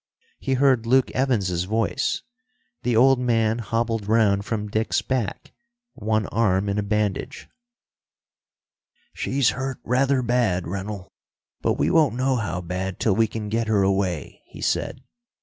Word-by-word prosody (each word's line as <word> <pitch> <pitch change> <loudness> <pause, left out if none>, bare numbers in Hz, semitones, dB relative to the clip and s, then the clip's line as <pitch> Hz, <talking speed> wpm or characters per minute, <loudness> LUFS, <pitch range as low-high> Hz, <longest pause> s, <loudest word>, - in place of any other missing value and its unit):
He 135 - -1
heard 130 -4 +3
Luke 130 +2 +3
Evans's 100 -10 0
voice. 110 +3 -1 0.6
The 120 -1 0
old 130 +3 +5
man 115 -2 +1
hobbled 115 -2 -1
round 105 -3 +3
from 105 -2 -2
Dick's 110 +2 0
back, 125 -7 -3 0.4
one 110 0 -1
arm 100 -3 +1
in 100 +1 0
a - - +1
bandage. 105 -1 -2 1.7
"She's 135 -2 +1
hurt 135 0 -4
rather 130 +2 +2
bad, 115 -7 +1
Rennell, 95 +1 -5 0.5
but - - +2
we - - 0
won't 150 -8 +3
know 130 +1 +1
how 90 -6 -3
bad 90 +2 -4
till 105 -4 +2
we 115 +1 +3
can 105 0 -5
get 115 +2 -1
her 105 -3 +3
away," 95 -5 -1
he - - -13
said. - - -1
110 Hz, 145 wpm, -24 LUFS, 100-125 Hz, 1.7 s, old